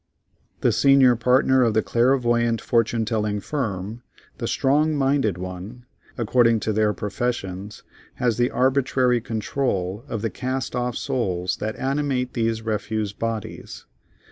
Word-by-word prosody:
The - - +3
senior 135 -3 +5
partner 130 +3 +3
of 115 -3 +2
the 110 - +3
clairvoyant 120 -2 +2
fortune 115 -3 +1
telling 105 -2 -1
firm, 110 -4 -4 0.4
the - - -2
strong 150 +3 +2
minded 135 -8 +1
one, 95 +7 -8 0.3
according 115 -1 +3
to 110 - -1
their 105 0 +2
professions, 105 -3 -4 0.3
has 120 -4 0
the 120 +1 +2
arbitrary 130 -2 +2
control 110 -3 -2
of 115 -2 -4
the 115 - -1
cast 130 +6 -3
off 125 -1 -1
souls 90 -7 -1
that 110 +1 -3
animate 135 -2 -1
these 115 -1 -1
refuse 110 -1 -2
bodies. 115 -1 -5
115 Hz, 130 wpm, -23 LUFS, 105-130 Hz, 0.4 s, senior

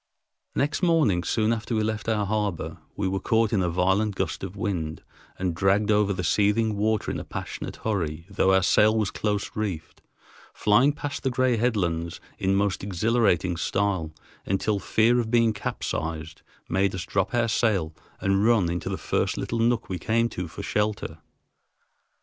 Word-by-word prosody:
Next 145 +5 0
morning, 155 - +3
soon 110 +4 +1
after 115 +1 -3
we 110 - +1
left 110 +1 -2
our 105 -2 +1
harbor, 105 -4 -2 0.2
we 100 - -1
were 95 +1 -1
caught 110 +2 +1
in 100 - +3
a 90 - +1
violent 95 +4 +1
gust - - -2
of 95 0 -6
wind 90 -7 -3 0.3
and 90 -2 -1
dragged 100 +4 +2
over 105 -1 +3
the 90 -2 -2
seething 105 +4 +2
water 110 +1 0
in - - -3
a - - -5
passionate - - -6
hurry, 85 -7 -2
though 95 -1 +2
our 95 -1 +4
sail 110 +4 +4
was 105 -3 0
close 105 -1 -2
reefed, 95 -8 -4 0.5
flying 110 +7 +4
past 145 -1 -5
the 135 - 0
gray 130 0 +2
headlands 90 -8 -1 0.2
in 95 +1 +1
most 100 -1 0
exhilarating 100 -3 +1
style, 95 -3 -1 0.3
until 100 +2 0
fear 115 +5 +3
of 115 -2 -1
being 115 -1 +3
capsized 80 -5 -4 0.3
made 95 0 +1
us 85 -3 -4
drop 100 +5 -1
our 120 -1 +2
sail 105 -8 +1 0.3
and 95 +1 +1
run 110 -7 +3
into 85 -2 -3
the - - -2
first - - -1
little 115 - -2
nook 115 0 +1
we 90 -2 -4
came 115 +1 +1
to 90 -4 -5
for - - -8
shelter. 105 -6 -2
100 Hz, 175 wpm, -25 LUFS, 95-110 Hz, 0.5 s, our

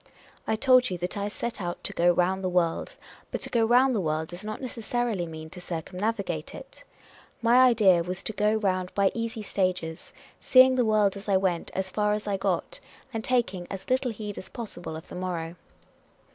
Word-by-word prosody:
I 220 - +2
told 255 +1 +4
you 180 - -3
that 180 +3 -4
I 200 0 -2
set 220 +1 -5
out 175 -1 -4
to - - -4
go 175 +1 +4
round 180 +2 +1
the 185 - 0
world; 175 -2 0 0.3
but - - -3
to - - -4
go 235 -2 +3
round 250 +3 +4
the 215 - 0
world 155 -1 -1
does 175 +3 -8
not 215 0 -5
necessarily 240 -6 -2
mean 160 -1 -9
to 180 - -9
circumnavigate 190 +5 -3
it. - - -12 0.6
My 235 +1 +4
idea 205 -8 +5
was 180 +2 -4
to 220 - -3
go 210 +1 +2
round 185 -4 0
by 200 -1 +3
easy 230 -1 -4
stages, 185 -5 -2 0.3
seeing 260 0 +7
the 250 -2 +2
world 210 -2 +3
as 200 +1 -8
I 195 - +5
went 185 -3 -1
as 190 0 -2
far 210 +1 +1
as 210 0 -3
I 205 -1 0
got, - - -2 0.3
and 225 -1 -3
taking 195 -9 0
as 195 +4 -7
little 255 0 +2
heed 210 -2 -6
as - - -10
possible 180 -8 -7
of 160 - -9
the - - -11
morrow. 175 -2 -4
200 Hz, 200 wpm, -27 LUFS, 180-225 Hz, 0.6 s, seeing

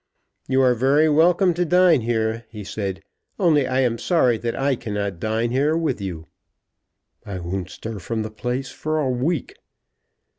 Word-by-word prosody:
"You 135 0 +3
are 125 -1 +5
very 135 +6 +3
welcome 175 +4 +4
to 175 +2 0
dine 180 -3 +4
here," 110 0 -1
he 105 -2 -8
said, 100 -1 -4 0.3
"only 155 -8 +3
I 130 0 +1
am 120 -3 0
sorry 130 -9 +2
that 115 0 -3
I 135 0 +1
cannot 100 -5 -4
dine 110 +3 -1
here 145 +5 +2
with 160 -10 -1
you." 85 -4 -5 1.0
"I 100 -2 -6
won't 90 +1 -4
stir 110 +1 -7
from 110 +4 -3
the 110 - -6
place 125 +4 -3
for 155 0 -3
a 150 -3 0
week." 135 +5 -2
125 Hz, 170 wpm, -22 LUFS, 110-150 Hz, 1.0 s, are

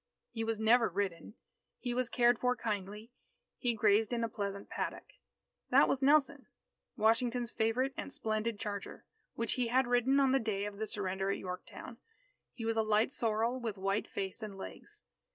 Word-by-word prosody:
He 225 - -3
was 225 0 -1
never 225 +1 +4
ridden. 195 +2 -3 0.4
He 245 -2 -3
was 250 0 0
cared 240 -1 +3
for 250 0 +2
kindly. 210 0 -4 0.5
He 240 -3 0
grazed 215 +1 +3
in 235 -1 0
a 230 - 0
pleasant 200 -2 -4
paddock. - - -5 0.6
That - - +6
was 270 - 0
Nelson, 280 0 +3 0.5
Washington's 235 +2 +2
favourite 245 +5 0
and - - -5
splendid 220 -2 -2
charger, 205 -1 -5 0.3
which 230 0 0
he 250 -2 0
had 260 +3 +3
ridden 245 +3 +3
on 270 -1 +4
the 270 - +4
day 210 -4 -2
of 205 -1 -6
the 220 - -2
surrender 195 -2 -2
at 200 - 0
Yorktown. 185 +6 -7 0.5
He 230 -3 -7
was 225 0 0
a - - +5
light 215 +4 +2
sorrel, 230 +2 0
with 225 -4 -4
white 195 +2 -1
face 195 +3 -4
and 210 -3 -6
legs. 190 - -10
225 Hz, 175 wpm, -33 LUFS, 205-245 Hz, 0.6 s, That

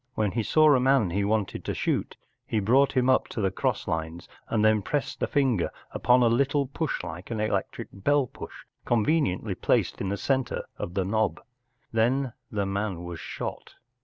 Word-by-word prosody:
When 105 -2 +1
he 115 - 0
saw 155 +6 +5
a 130 - +4
man 130 -7 +3
he 100 +3 0
wanted 105 -2 -1
to - - -2
shoot - - -1 0.3
he 110 - 0
brought 135 +7 +3
him 125 0 +3
up 130 - +3
to - - -6
the 95 -3 +1
cross - - -1
lines, 80 +1 -3 0.2
and 110 -2 +2
then 110 -1 +4
pressed 145 +8 -3
a - - +1
finger 130 -10 +1 0.2
upon 125 0 +3
a - - +5
little 140 +4 +2
push 140 - -3
like 85 +2 -7
an 115 -2 -3
electric 105 -3 -2
bell 140 +8 +2
push, - - -10 0.2
conveniently 120 - +1
placed - - 0
in 95 - -1
the 100 - -1
centre 130 0 -1
of 90 - -6
the 95 -2 +1
knob. 105 -3 0 0.5
Then 120 +3 +1 0.2
the 100 -2 -1
man 95 -2 -2
was 85 -1 -6
shot. - - -6
110 Hz, 190 wpm, -27 LUFS, 95-130 Hz, 0.5 s, saw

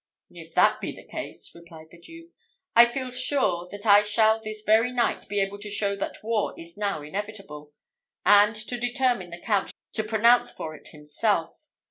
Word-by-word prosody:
"If - - -13
that - - +4
be - - -3
the - - -13
case," - - -7
replied 165 -2 -15
the 170 - -16
Duke, 330 - -14 0.4
"I 235 +1 +9
feel 255 +1 -5
sure 250 -9 0
that 205 +3 -7
I 205 -1 +7
shall 220 +1 +2
this 215 -1 -7
very 220 +3 +3
night 245 -4 -1
be 205 0 -1
able 195 +1 -2
to 210 0 -6
show 200 -1 0
that 200 - -6
war 220 -1 -2
is 165 0 -10
now 200 -7 -2
inevitable; 190 -4 -7 0.5
and 205 +2 +6
to 225 +3 -2
determine 245 -6 0
the 170 - -8
Count 205 0 0 0.2
to 220 - 0
pronounce 235 +3 +4
for 155 - -7
it 150 - -13
himself. 165 - -3
210 Hz, 180 wpm, -25 LUFS, 180-230 Hz, 0.5 s, I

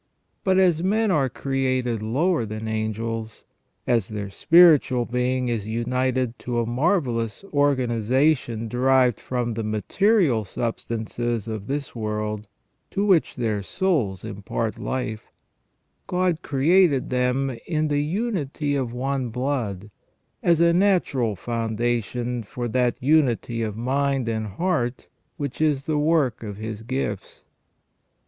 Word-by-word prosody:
But 190 -1 +3
as 180 -4 +4
men 210 +3 +2
are 140 -6 +2
created 130 -3 -1
lower 145 +8 +1
than 110 0 -5
the 110 - -3
angels; 110 +1 -3 0.4
as 115 -5 +2
their 105 -2 -5
spiritual 155 - +5
being 125 +1 0
is 115 -4 -2
united 125 +1 -1
to 120 -1 -2
a 115 - 0
marvellous 120 - 0
organization 130 -2 +1
derived 125 0 +3
from 120 -2 -2
the 115 - -3
material 130 - +2
substances 115 +1 -3
of 110 -3 -5
this 140 -1 -3
world, 105 -1 -3 0.4
to 200 +1 -1
which 185 -6 +3
their 110 -5 -1
souls 115 - -1
impart 105 +1 -3
life, 110 -5 -4 0.8
God 180 -2 +1
created 145 0 +3
them 125 +1 0
in 155 -2 0
the 145 -1 +1
unity 160 - -2
of 130 -4 -2
one 130 0 -2
blood, 115 -6 -3 0.5
as 170 -2 +3
a 170 0 +5
natural 170 - +2
foundation 120 +2 -2
for 120 +3 -5
that 125 0 +1
unity 125 -5 +2
of 110 -2 -3
mind 135 +1 0
and 110 -1 -2
heart 125 - -1 0.3
which 140 0 -4
is 145 -3 +1
the 155 -2 0
work 150 -6 +2
of 105 -3 -6
His 110 0 -5
gifts. 120 -4 -4
125 Hz, 125 wpm, -24 LUFS, 115-145 Hz, 0.8 s, spiritual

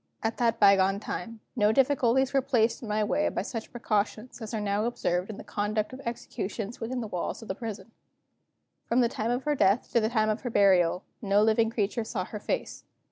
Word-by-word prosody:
At 225 0 -1
that 230 -1 +1
bygone 195 -1 +5
time, 225 +1 -6
no 210 -3 +4
difficulties 265 0 +3
were 270 - +4
placed 235 -4 +1
in 235 - -7
my 210 0 +1
way 295 +8 +1
by - - -2
such 225 -3 -6
precautions 225 +1 -2
as 220 - -6
are 220 - -2
now 205 +1 0
observed 180 -6 -1
in 215 - -6
the - - -8
conduct 210 +2 -2
of 260 - -8
executions 225 -1 -5
within 245 +2 -3
the 225 - -4
walls 180 +3 -4
of - - -11
the - - -2
prison. 215 -1 -7 1.0
From 240 +2 +3
the 240 - +4
time 225 -2 -2
of 245 +2 0
her 295 - +1
death 205 -3 +2
to 235 - +4
the 220 -1 +1
time 215 -2 +2
of 215 - -3
her 245 - -3
burial, 185 -4 +4 0.2
no 205 -1 +3
living 225 +1 +3
creature 220 0 -1
saw 205 -4 -3
her 210 - -7
face. - - -3
220 Hz, 215 wpm, -28 LUFS, 205-240 Hz, 1.0 s, bygone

